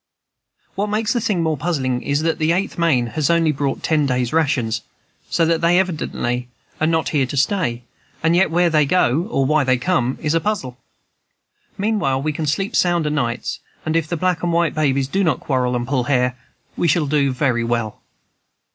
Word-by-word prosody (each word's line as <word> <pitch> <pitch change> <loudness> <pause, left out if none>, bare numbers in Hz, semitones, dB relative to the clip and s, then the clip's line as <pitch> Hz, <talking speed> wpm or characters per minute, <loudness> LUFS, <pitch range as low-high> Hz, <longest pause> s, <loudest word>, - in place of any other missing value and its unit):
"What 205 +2 -1
makes 215 +2 0
the 240 - 0
thing 195 -6 0
more 160 -1 +1
puzzling 135 -5 -1
is, 145 +2 -1
that 165 0 0
the 160 +1 +2
Eighth 190 +3 -1
Maine 160 -8 +2
has 155 -3 0
only 165 -2 +3
brought 140 -1 -2
ten 155 -3 +2
days' 125 -1 -1
rations, 125 -8 +1 0.5
so 165 - +2
that 165 0 +1
they 170 +1 +4
evidently 125 -9 -2 0.3
are 155 - +2
not 160 0 +1
to 140 -4 0
stay 185 +3 +2
here; 120 +1 -9 0.4
and 165 +1 +3
yet 190 0 +3
where 175 +1 +2
they 155 -1 +4
go, 160 +1 +2
or 135 - +1
why 155 +1 +3
they 130 -1 +2
come, 130 -3 0
is 150 -1 -1
a 165 - +2
puzzle. 170 -13 -3 1.0
Meanwhile 200 -11 0
we 155 0 -1
can 155 +1 -3
sleep 195 +9 -1
sound 175 -3 +2
o' 150 - 0
nights; 120 -5 -2 0.3
and 155 0 -1
if 165 -2 +1
the 170 - -2
black 180 0 0
and 175 - 0
white 170 0 +1
babies 140 -3 +1
do 195 +8 0
not 160 -7 +1
quarrel 125 -3 0
and 120 0 -2
pull 130 -2 0
hair, 125 -2 +1 0.4
we 170 - 0
shall 160 0 +2
do 140 -1 +1
very 125 -3 0
well." 115 -2 -2
155 Hz, 200 wpm, -20 LUFS, 130-170 Hz, 1.0 s, they